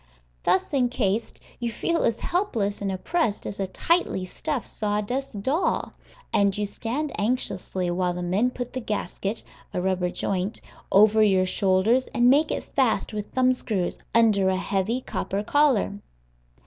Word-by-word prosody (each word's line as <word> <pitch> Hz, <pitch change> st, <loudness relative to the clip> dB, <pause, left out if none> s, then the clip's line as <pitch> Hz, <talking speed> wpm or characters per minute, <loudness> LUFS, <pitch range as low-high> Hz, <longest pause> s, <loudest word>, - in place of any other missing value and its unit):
Thus 190 Hz, -, +2 dB
incased, 240 Hz, -5 st, 0 dB, 0.2 s
you 235 Hz, -1 st, -2 dB
feel 335 Hz, +9 st, 0 dB
as 230 Hz, -, +1 dB
helpless 230 Hz, -, -1 dB
and 195 Hz, -1 st, -1 dB
oppressed 215 Hz, -, -1 dB
as 200 Hz, -, -6 dB
a 195 Hz, -, -1 dB
tightly 190 Hz, -, 0 dB
stuffed 285 Hz, -, -3 dB
sawdust 210 Hz, +2 st, -2 dB
doll, 300 Hz, -, 0 dB, 0.4 s
and 200 Hz, -1 st, +3 dB
you 210 Hz, -, 0 dB
stand 245 Hz, +8 st, -3 dB
anxiously 190 Hz, -5 st, -1 dB
while 180 Hz, 0 st, 0 dB
the 180 Hz, -, -4 dB
men 195 Hz, +8 st, +2 dB
put 245 Hz, -1 st, -6 dB
the 260 Hz, -, -2 dB
gasket 210 Hz, -1 st, -3 dB, 0.3 s
(a -, -, +1 dB
rubber 185 Hz, -1 st, 0 dB
joint) 190 Hz, +3 st, -2 dB, 0.3 s
over 215 Hz, +2 st, +6 dB
your 190 Hz, -3 st, +4 dB
shoulders 195 Hz, +7 st, +2 dB
and 245 Hz, +1 st, +5 dB
make 295 Hz, +3 st, +4 dB
it -, -, -2 dB
fast 255 Hz, -4 st, 0 dB
with 210 Hz, -1 st, -5 dB
thumb 255 Hz, 0 st, +4 dB
screws, 205 Hz, -8 st, -2 dB, 0.2 s
under 210 Hz, -5 st, +4 dB
a 190 Hz, -, +1 dB
heavy 200 Hz, +6 st, -1 dB
copper 200 Hz, -4 st, -3 dB
collar. 255 Hz, -6 st, +2 dB
210 Hz, 150 wpm, -25 LUFS, 190-250 Hz, 0.4 s, over